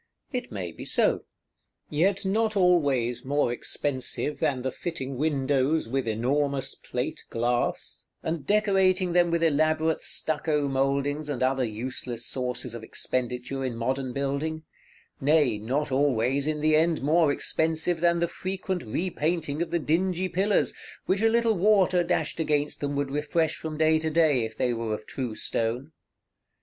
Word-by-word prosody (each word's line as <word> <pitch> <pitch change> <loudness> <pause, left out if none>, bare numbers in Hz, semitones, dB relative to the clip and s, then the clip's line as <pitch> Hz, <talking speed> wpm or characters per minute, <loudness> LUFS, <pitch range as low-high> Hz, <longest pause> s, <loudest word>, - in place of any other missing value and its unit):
It 250 - -4
may 95 -5 -4
be - - -9
so: - - +1 0.7
yet 190 +6 +1
not 215 +2 +1
always 140 -10 +2
more 140 -2 +1
expensive 135 +3 -1
than 140 -6 0
the 130 - -1
fitting 140 -6 -5
windows 140 0 +1
with 130 0 -1
enormous 135 +4 +1
plate - - -4
glass, 120 +1 -1 0.2
and 160 -2 -2
decorating 190 -1 +2
them 175 -1 +4
with 170 0 +1
elaborate 155 +1 +2
stucco 150 -2 -1
mouldings 140 +2 0
and 130 -3 -1
other 130 0 +2
useless 120 +1 -4
sources 125 -2 -3
of 115 - -6
expenditure 125 +3 -2
in 125 -3 -2
modern 130 +3 -2
building; 140 +4 -2 0.6
nay, 140 -6 +3
not 135 +7 -1
always 135 0 +1
in 155 -1 -1
the 155 0 +4
end 160 -1 +2
more 155 +1 +4
expensive 160 +3 0
than 170 0 +3
the 170 0 +1
frequent 185 +1 -3
repainting 155 +3 -2
of 170 - -1
the 170 - +1
dingy 180 +3 0
pillars, 195 +4 +1 0.3
which 195 +2 +1
a 225 - +5
little 230 0 +3
water 190 -2 +3
dashed 170 -2 -1
against 150 -2 0
them 145 0 -2
would 140 -1 -1
refresh 155 +2 0
from 155 -1 -5
day 160 0 +4
to 160 0 -1
day, 155 -6 +3
if 110 0 -8
they 125 -1 +1
were 115 -2 -2
of 110 - -10
true 125 -5 -4
stone. 120 +8 -2
150 Hz, 155 wpm, -27 LUFS, 130-170 Hz, 0.7 s, a